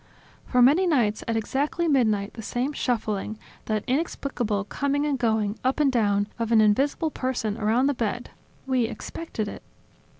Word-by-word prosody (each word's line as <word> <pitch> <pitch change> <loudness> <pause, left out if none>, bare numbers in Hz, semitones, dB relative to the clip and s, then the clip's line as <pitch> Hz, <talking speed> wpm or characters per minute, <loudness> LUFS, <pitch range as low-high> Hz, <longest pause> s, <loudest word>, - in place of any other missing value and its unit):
For 250 -1 +4
many 315 +9 +5
nights, 235 -10 +1
at 230 -1 0
exactly 285 +9 -1
midnight, 220 -8 +2
the 225 - -8
same 245 +6 -2
shuffling, 215 -5 -2 0.3
that 215 -1 -1
inexplicable 255 - -1
coming 285 +7 -1
and 285 -3 0
going, 220 -2 0
up 260 +4 +1
and 285 -3 +4
down, 205 -4 +2
of 230 0 -1
an 225 - +6
invisible 275 +9 +2
person, 250 -7 -2
around 225 +4 +2
the 285 - +2
bed. 235 -1 -3 0.3
We 260 -3 +1
expected 230 0 -5
it." - - -7
240 Hz, 160 wpm, -25 LUFS, 215-275 Hz, 0.3 s, an